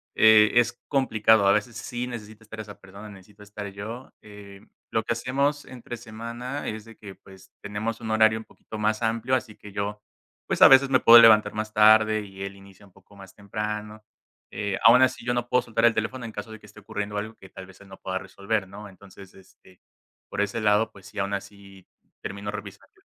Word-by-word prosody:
eh, 110 -1 +6
es 120 -1 +3 0.2
complicado. 110 -6 +3
A - - +6
veces 105 +3 -2
sí 120 0 -5
necesita 110 -2 -9
estar 110 +1 -10
esa 105 -2 -12
persona, 100 +3 -12
necesito 100 +1 -16
estar 105 0 -8
yo, 110 +6 -8
eh, 100 -1 -13 0.3
lo - - 0
que - - -4
hacemos 140 +5 -1
entre 120 -1 -9
semana 120 +4 -7
es 110 0 -7
de 115 0 -14
que 100 -2 -11
pues 95 -1 -18
tenemos 105 +3 -4
un 110 -1 -5
horario 110 0 +4
un 110 - -11
poquito 110 - -11
más 105 +1 -1
amplio, 115 +2 -1
así 120 -4 -4
que 105 - -13
yo 105 +1 -4 0.4
pues - - -3
a - - +11
veces 135 0 +6
me 130 -1 +4
puedo 120 +1 +9
levantar 110 -2 +6
más 110 0 -5
tarde 110 0 +5
y 95 -1 -10
él 100 0 -6
inicia 100 0 -17
un 100 - -22
poco 100 +2 -22
más 95 -1 -14
temprano, 105 +1 -6 0.5
eh, 100 -2 -3
aun 120 +3 +8
así, 130 -2 +1
yo 120 - 0
no 120 0 -2
puedo 125 - +3
soltar 115 +1 0
el 115 - +5
teléfono 120 +3 -3
en 115 - -7
caso 105 +2 -7
de 110 - -10
que - - -18
esté 105 +1 -16
ocurriendo 105 +1 -5
algo 110 +2 -5
que 95 - -16
tal 95 - -11
vez 95 0 -17
él 100 - -16
no 95 - -13
pueda 95 0 -4
resolver, 100 +2 -3
¿no?, 105 +2 -11
entonces, 95 0 -16
este, 95 -1 -21 0.5
por - - -2
ese 105 +3 -2
lado, 105 +1 +2
pues 100 -3 -17
sí, 105 - -15
aun 100 0 -2
así 100 -1 -9 0.3
termino 100 +1 -6
revisando. 105 - -11
105 Hz, 215 wpm, -25 LUFS, 100-115 Hz, 0.5 s, a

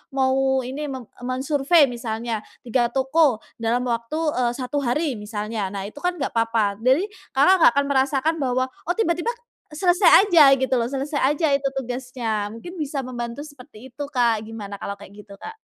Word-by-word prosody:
mau 265 0 +2
ini, 275 +4 -5
me 260 -2 -6 0.2
mensurvei 275 +3 +2
misalnya 230 -1 -4 0.2
3 240 0 +1
toko 270 -2 +2 0.2
dalam 230 +2 0
waktu, 235 +6 -2 0.2
eee, 245 -1 +1
1 260 +2 -4
hari 275 +2 0
misalnya, 210 -1 -4
nah 195 - -4
itu 215 - -14
kan 355 +3 -1
enggak 280 -5 -3
apa-apa. 225 -3 +1
Jadi 265 - +2 0.3
Kakak 290 +8 +6
nggak - - +7
akan 280 0 +2
merasakan 280 +3 +1
bahwa, 255 -1 0
oh 350 +7 -5
tiba-tiba 355 +1 0 0.4
selesai 365 +4 +5
aja 310 -8 +7
gitu 260 0 0
loh, 230 - 0
selesai 275 +3 -3
aja 310 +1 0
itu 275 0 -1
tugasnya 245 -5 -3
mungkin 345 +11 -9
bisa 290 -3 -3
membantu 240 0 -5
seperti 260 -5 -13
itu 290 - -6
Kak, 230 -4 +1
gimana 210 -3 -7
kalau 200 - -5
kayak 200 -1 -14
gitu, 205 -1 -13
Kak? 445 - -9
260 Hz, 170 wpm, -23 LUFS, 230-290 Hz, 0.4 s, nggak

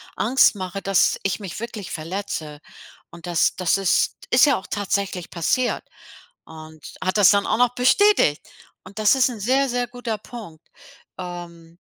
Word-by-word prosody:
Angst 240 0 +3
mache, 190 0 -5
dass 195 -2 +2
ich 195 +1 -1
mich 190 -1 -7
wirklich 220 -4 -7
verletze. 160 -3 -5 0.5
Und 170 0 -12
das 170 -2 +1
das 185 0 +1
ist 195 -3 +1
ist 250 - +6
ja 280 -3 +3
auch 190 - -10
tatsächlich 200 -3 -3
passiert. 240 +9 -1 0.6
Und 155 -1 -13 0.2
hat 185 +3 -1
das 200 -4 +6
dann 200 -1 +2
auch - - +1
noch 245 0 +2
bestätigt. 260 - +3 0.4
Und 195 +3 -12
das 215 +3 +4
ist 260 -1 +2
'n 230 - -8
sehr, 260 +5 +1
sehr 245 0 -1
guter 245 -3 -5
Punkt. 205 -9 -12 0.5
Ähm. 170 -2 -9
195 Hz, 160 wpm, -22 LUFS, 170-240 Hz, 0.6 s, ist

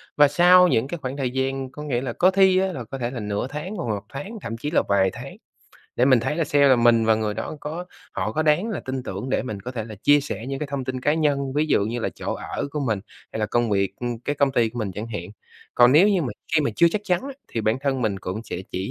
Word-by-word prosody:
và 145 0 +6
sau 180 +5 +6
những 130 -5 +1
cái 170 - -4
khoảng 130 -1 -5
thời 135 -3 -1
gian, 130 0 -2
có 150 - -8
nghĩa 125 -5 -1
là, 130 -3 -3
có 185 +8 +4
thi 190 -1 +5
á 190 - +2
là, 130 - -5
có 135 +5 -7
thể 120 -1 -3
là 125 - -5
nửa 105 +3 -2
tháng 150 +9 -6
hoặc 170 - -4
là - - +1
1 100 - -23
tháng, 170 +12 -7
thậm 115 0 -5
chí 145 +6 -4
là - - +3
vài 95 -1 +3
tháng, - - -9 0.6
để 125 - +4
mình 130 -3 +5
thấy 150 +6 -2
là 165 - +1
xe 145 -1 +4
là 130 - +6
mình 120 -1 +4
và 110 0 +4
người 110 -1 -2
đó 155 - -5
có 160 +4 -5 0.3
họ 105 +4 -2
có 155 - 0
đáng 160 +7 +2
là 200 -9 -3
tin 130 0 -4
tưởng 125 - -5
để - - +1
mình 105 -6 -5
có 125 - -6
thể 115 -4 -4
là 110 - -9
chia 145 +8 +4
sẻ 115 -4 -6
những 135 0 -3
cái 150 - -3
thông 140 -2 -4
tin 130 0 -4
cá 145 +4 +2
nhân, 140 -4 0
ví 150 +3 +1
dụ 150 - +3
như 120 +3 -3
là - - -1
chỗ - - -4
ở - - -4
của 150 - -3
mình 110 -3 0 0.3
hay 110 - -3
là 105 - +1
công 120 -1 0
việc, 100 -1 +1
ưm, 120 -1 -3
cái 145 - -2
công 140 -1 +2
ty 120 -4 +2
của 120 +2 -8
mình 105 -4 -2
chẳng 105 +4 -5
hạn, 105 -7 -5 0.5
còn 120 +1 +6
nếu 175 +8 +6
như 190 -5 +2
mà 130 - -2 0.3
khi 155 - +5
mà 145 - 0
chưa 170 - +6
chắc 210 - -1
chắn 180 -3 +1
á 275 0 -6 0.2
thì 115 - -3
bản 110 +2 +1
thân 135 -2 -1
mình 105 -4 0
cũng 95 +4 -5
sẽ - - -5
chỉ 95 +1 -3
130 Hz, 300 wpm, -23 LUFS, 115-150 Hz, 0.6 s, và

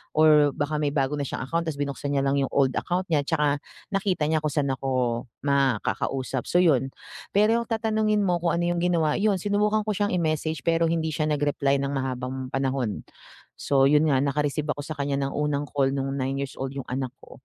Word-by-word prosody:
or 150 -2 +5
baka 150 0 -1
may 145 -1 +1
bago 140 +1 0
na 140 - -2
siyang - - -4
account 165 +5 -2
tas 155 - -2
binuksan 140 0 -3
niya 135 - +2
lang 140 +1 +1
'yong 135 - 0
old 135 -2 +3
account 180 +1 -1
niya, 145 -2 +2
tsaka 145 -1 +2 0.3
nakita 195 -5 0
niya 160 - +2
kung 150 -2 -2
saan 145 -3 0
ako 125 -3 -1 0.2
makakausap, 135 -1 0
so, 175 - +3
yun. 135 -6 +3 0.5
Pero 225 +3 +3
tatanungin 215 -2 +1
mo 180 -2 +2
kung 170 -1 0
ano 175 - 0
yung 175 - -1
ginawa, 165 -4 +2
yun 205 -1 +3
sinubukan 205 +3 +1
ko 215 - -1
siyang 205 -1 0
i-message 155 -1 -1
pero 165 0 +2
hindi 160 -1 0
siya 155 0 -1
nag-reply 145 -2 +1
ng 140 - -1
mahabang 130 -1 -4
panahon. 135 -5 -1 0.6
So, 135 -1 +3
yun 150 +3 +4
nga 135 -1 +2
naka-receive 145 +1 -1
ako 145 - -7
sa 155 +1 -6
kanya 140 -1 -1
ng - - -7
unang 145 -1 -1
call 135 -2 +1
nung 135 0 -2
nine-years-old 135 0 -3
yung 135 -2 -7
anak 130 0 -3
ko. - - -16
145 Hz, 200 wpm, -25 LUFS, 135-165 Hz, 0.6 s, or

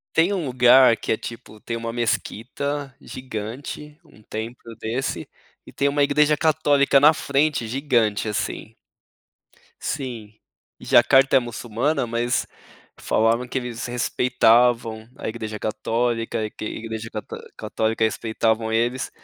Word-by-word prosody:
Tem 170 +5 +4
um 175 -7 -2
lugar 125 -1 +6
que - - -2
é - - +1
,tipo, 115 -2 -9
tem 115 - -4
uma 115 0 -4
mesquita 130 +4 -3
gigante, 130 +5 -7
um 110 -8 -20
templo 115 +2 -7
desse, 120 +5 -3 0.4
e - - -12
tem 140 - +1
uma 145 +1 +1
igreja 150 +1 +3
católica 145 -3 +3
na 150 +3 +7
frente 140 -4 0
gigante, 120 -5 +1
assim. 105 - -4 1.1
Sim. 120 -7 -5 0.5
Jacarta 135 +3 +5
é - - +9
muçulmana, 120 +3 -2
mas 120 +1 -1 0.5
falavam 115 +3 +1
que 130 - -2
eles 125 -1 -5
respeitavam 120 -2 +2
a - - -5
igreja 110 -1 -5
católica, 115 +1 -1
e 105 - -4
que - - -8
a - - -2
igreja 110 0 -6
cató 105 - -6 0.2
católica 110 0 -1
respeitavam 110 0 0
eles, 120 +3 0
120 Hz, 130 wpm, -23 LUFS, 110-135 Hz, 1.1 s, é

